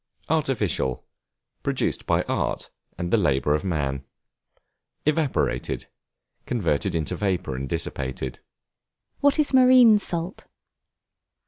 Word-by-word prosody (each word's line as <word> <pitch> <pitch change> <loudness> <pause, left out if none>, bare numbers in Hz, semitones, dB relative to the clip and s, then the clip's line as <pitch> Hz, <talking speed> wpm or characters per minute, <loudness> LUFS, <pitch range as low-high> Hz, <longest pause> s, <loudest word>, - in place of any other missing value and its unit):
Artificial, 115 - 0 0.6
produced - - -1
by - - +2
art, - - -2 0.3
and 85 0 -3
the - - +6
labor 75 -5 +2
of 75 - 0
man. 70 -7 -2 1.0
Evaporated, 150 -2 0 0.6
converted 85 - 0
into 80 -3 -1
vapor 95 -9 -1
and 65 +1 -4
dissipated. 65 -1 -4 0.8
What 285 +1 +3
is 300 -2 +1
Marine 255 -4 +7
Salt? 175 -1 -4
95 Hz, 100 wpm, -25 LUFS, -, 1.0 s, Marine